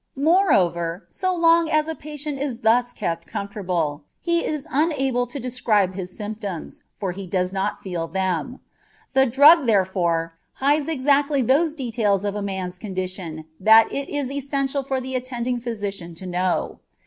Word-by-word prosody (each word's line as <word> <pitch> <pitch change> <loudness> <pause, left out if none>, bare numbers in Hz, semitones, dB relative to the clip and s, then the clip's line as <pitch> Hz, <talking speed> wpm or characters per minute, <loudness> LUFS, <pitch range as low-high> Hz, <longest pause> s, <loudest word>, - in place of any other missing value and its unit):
Moreover, 195 - +2
so 370 -1 -1
long 335 -1 +4
as 310 0 +2
a 320 - -2
patient 300 -2 -6
is 260 -4 -3
thus 245 +2 +3
kept 170 -7 -3
comfortable, 180 -7 -3 0.2
he 340 -1 0
is 300 -3 -3
unable 270 -5 +1
to 265 +4 -5
describe 225 -6 +1
his 185 -1 -5
symptoms, 210 -5 -6 0.2
for 195 -3 -2
he 190 +1 -7
does 180 0 -1
not 195 0 -2
feel 175 -3 -3
them. 190 - -2 0.5
The 265 0 +4
drug, 285 +4 +7
therefore, 180 -5 +1 0.2
hides 285 +2 +1
exactly 285 -1 +2
those 300 +6 +2
details 220 - 0
of 205 - -1
a 205 - -3
man's 190 -2 -4
condition 185 -5 -5
that 220 +3 +6
it 280 0 -3
is 285 -3 -2
essential 275 0 -1
for 270 0 -2
the 260 +1 -6
attending 250 -1 -2
physician 200 -7 -5
to 185 - -8
know. 180 0 -1
230 Hz, 155 wpm, -23 LUFS, 185-280 Hz, 0.5 s, drug